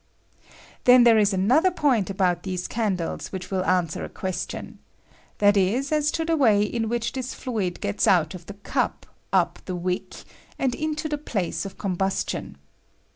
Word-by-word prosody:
Then 250 0 +8
there 230 -2 +6
is 210 -1 +3
another 245 - +3
point 270 - +1
about 185 -3 +1
these 185 -1 -4
can 215 -5 0
dles 170 - -5
which 185 0 -6
will 190 -1 0
answer 180 -4 0
a - - -5
question— 185 -1 -5 0.6
that 205 0 +4
is, 220 +9 +1
as 300 -1 +2
to 325 - -1
the 330 0 +1
way 220 -9 +4
in 225 +1 -2
which 235 0 -1
this 260 -1 -5
fluid 205 -8 -3
gets 100 +1 0
out 160 -4 +3
of 180 -2 -10
the 200 - -8
cup, 205 - -2 0.3
up - - +2
the 185 - -4
wick, 180 +1 -4 0.3
and 260 -2 0
into 310 +2 -2
the 295 -1 -3
place 200 - -2
of 195 - -12
com 190 -3 -2
tustiou. 195 +1 -2
205 Hz, 180 wpm, -24 LUFS, 185-250 Hz, 0.6 s, Then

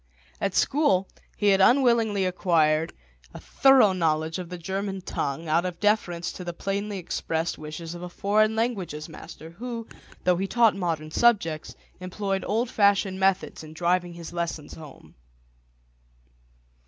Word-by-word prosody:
At 195 -2 -1
school 195 -11 +2 0.3
he 205 - +3
had 195 -1 +4
unwillingly 230 -4 +4
acquired 165 -3 +2 0.4
a - - -7
thorough 265 -7 +5
knowledge 160 -1 0
of 180 -2 -7
the 180 - -6
German 190 +2 -4
tongue 160 -2 -3
out 165 +3 +2
of 180 -2 -4
deference 200 -5 0
to 180 - -8
the 175 -1 -5
plainly 200 +3 -3
expressed 165 -2 -3
wishes 155 +2 -7
of 175 - -8
a 180 - -6
foreign 215 +4 +1
languages 195 -10 -2
master, 160 0 -11
who, 230 +4 -6 0.4
though 180 -1 +3
he 195 +2 -1
taught 230 0 +4
modern 165 -5 -3
subjects, 165 -9 +1 0.2
employed 195 +1 -3
old 230 +4 0
fashioned 200 -2 +2
methods 190 -3 0
in 155 0 -11
driving 175 +1 0
his 170 -1 -9
lessons 170 -3 -4
home. 155 -4 -13
185 Hz, 145 wpm, -26 LUFS, 165-205 Hz, 0.4 s, thorough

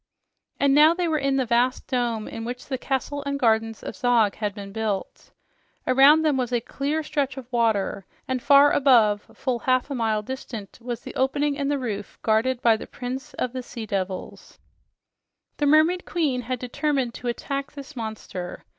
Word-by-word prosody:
And 280 -1 +4
now 305 +3 +6
they 355 -1 0
were 315 -2 +1
in 275 -1 +1
the 260 - +1
vast 245 +2 +1
dome 235 -4 -1
in 225 - -6
which 245 +2 -6
the 260 -2 -4
castle 280 +2 -2
and 280 0 -2
gardens 225 -2 +1
of - - -6
Zog 235 -4 +3
had 210 -2 -3
been 200 -2 -8
built. 210 -2 -4 0.6
Around 275 +5 +6
them 300 -4 +2
was 250 -2 -1
a 240 - +2
clear 285 +6 -2
stretch 280 -3 -2
of 265 - -7
water, 210 -5 0 0.2
and 260 -1 -1
far 285 +1 +6
above 230 -7 +4
full 255 -3 -2
half 255 +3 +1
a - - 0
mile 220 -4 0
distant 225 -4 -7
was 240 -1 -5
the - - -9
opening 285 +2 +1
in 280 -1 -2
the 290 0 +1
roof 210 -6 -5
guarded 235 +3 +1
by 225 -2 +5
the - - -9
prince 255 +1 -6
of 250 -1 -2
the 255 - -3
sea 235 -2 -7
devils. 190 -2 -5 1.0
The 290 - +1
mermaid 315 +5 +4
queen 290 -7 -1
had 250 +2 -3
determined 255 0 -1
to 245 - -7
attack 275 +3 -3
this 285 +1 -10
monster. 215 -6 -6
250 Hz, 185 wpm, -24 LUFS, 225-280 Hz, 1.0 s, now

